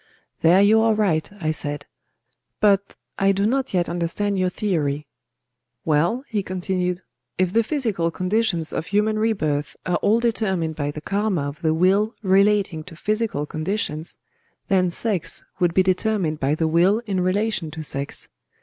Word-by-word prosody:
"There 180 +4 +6
you 220 +2 +5
are 225 -1 +3
right," 185 -7 +1
I 155 -3 0
said; 145 -1 -3 0.7
"but 200 -1 +2 0.2
I 195 0 +4
do 195 +1 0
not 260 +4 0
yet 175 -2 +1
understand 175 +4 -1
your 185 0 +2
theory." 150 -7 -1 0.8
"Well," 165 - +1
he 210 -2 -1
continued, 180 -1 -2 0.4
"if 185 0 +1
the 230 - +4
physical 220 - -1
conditions 185 -2 0
of 160 - -3
human 215 +1 +1
rebirth 155 -10 -1
are 180 - +1
all 215 +3 +2
determined 190 -9 0
by 145 -1 -2
the 150 +1 -6
karma 200 -2 -1
of 145 +4 -8
the 160 -2 +1
will 195 +6 +2
relating 195 -3 +3
to 180 - -11
physical 210 -5 -1
conditions, 155 0 -3 0.5
then 185 -3 +3
sex 190 -1 -1
would 175 -2 +1
be 190 - +5
determined 185 -4 0
by 140 +3 +1
the 160 0 0
will 180 +8 +3
in 195 -4 -1
relation 190 -2 0
to 160 +1 -7
sex. 140 -1 -3
185 Hz, 160 wpm, -22 LUFS, 160-210 Hz, 0.8 s, There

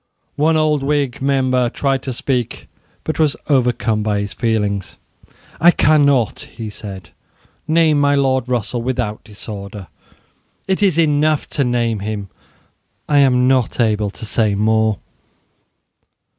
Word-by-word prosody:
One 160 +2 +2
old 155 -2 +1
Whig 140 -3 -1
member 130 -3 +1
tried 135 +1 -1
to 135 - -5
speak, 125 -1 -3 0.4
but 155 - -4
was 155 -3 +2
overcome 120 -5 +1
by 105 -1 0
his 100 -1 -5
feelings. 105 -4 -1 0.6
"I 170 - +6
cannot," 140 -7 +3
he 110 -2 -8
said, 95 -5 -9 0.6
"name 155 -2 +3
my 145 0 +3
Lord 130 -2 +1
Russell 120 0 -1
without 115 -4 -3
disorder. 100 -2 -9 0.8
It 190 +1 0
is 190 -6 +3
enough 155 -1 +2
to 140 - 0
name 120 -3 0
him. 100 -1 -5 0.8
I 145 -1 +3
am 125 -2 +4
not 130 -2 +1
able 105 -3 +1
to 110 - -10
say 105 -1 0
more." 110 0 +2
125 Hz, 130 wpm, -18 LUFS, 110-145 Hz, 0.8 s, I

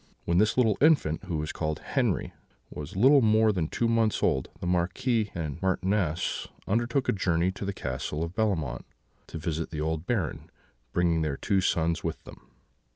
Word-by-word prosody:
"When 85 +1 +2
this 110 +4 +2
little 110 -5 +3
infant, 140 - +3
who 85 - -2
was 75 0 -3
called 80 -2 -2 0.2
Henri, - - 0 0.4
was 75 +3 -7
little 135 +8 +6
more 110 -1 +4
than 90 -6 -1
two 115 - -1
months 115 -2 +1
old, 65 -6 +1
the - - -5
Marquis 105 +6 0
and 80 -2 -4
Marchioness 95 -2 0 0.2
undertook 120 +5 0
a - - +4
journey 90 -2 +1
to 100 +1 -6
the 100 - -1
Castle 75 -1 -4
of 85 +1 -5
Bellemont, 95 - -1 0.4
to - - -7
visit 80 0 -3
the 75 -2 -4
old 80 +1 -2
Baron, 95 - -2 0.4
bringing 85 0 +2
their 75 -3 -1
two 100 -2 +1
sons 85 -2 0
with - - -4
them. - - -14
90 Hz, 175 wpm, -28 LUFS, 80-110 Hz, 0.4 s, little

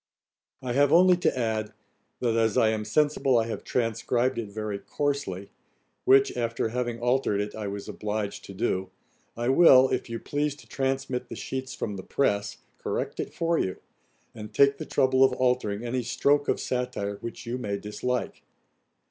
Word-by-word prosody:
'I 125 -2 -2
have 140 +2 +4
only 180 +1 +7
to 175 - 0
add, 110 -3 -1 0.5
that 120 -2 +1
as 115 -2 +2
I 110 - +5
am 110 -1 -1
sensible 135 +1 +2
I 115 - +2
have 115 - -5
transcribed 120 +2 0
it 110 -3 -5
very 105 -1 -4
coarsely, 120 -11 -3 0.5
which, 135 +1 +5
after 115 -2 -1
having 120 0 -2
altered 125 -4 +1
it, 105 0 -3
I 110 -2 -5
was 100 0 -5
obliged 105 -1 -4
to 100 - -10
do, 95 0 -1 0.5
I 120 +1 -1
will, 130 -3 +7
if - - -2
you 115 - -3
please 145 +3 -2
to - - -17
transmit 135 -2 -2
the - - -6
sheets 130 -1 -5
from 105 -2 -4
the 95 - -7
press, 100 -5 0 0.2
correct - - -3
it - - -3
for 165 0 0
you; 95 - -1 0.6
and 105 -1 -9
take 140 0 +4
the - - -6
trouble 130 0 +3
of 130 -1 +4
altering 125 -5 0
any 125 +1 -1
stroke 145 +4 +1
of - - +1
satire 125 -5 -2
which 115 - -8
you 120 +2 -3
may 100 -4 -2
dislike. 125 +5 -3
120 Hz, 175 wpm, -27 LUFS, 105-130 Hz, 0.6 s, only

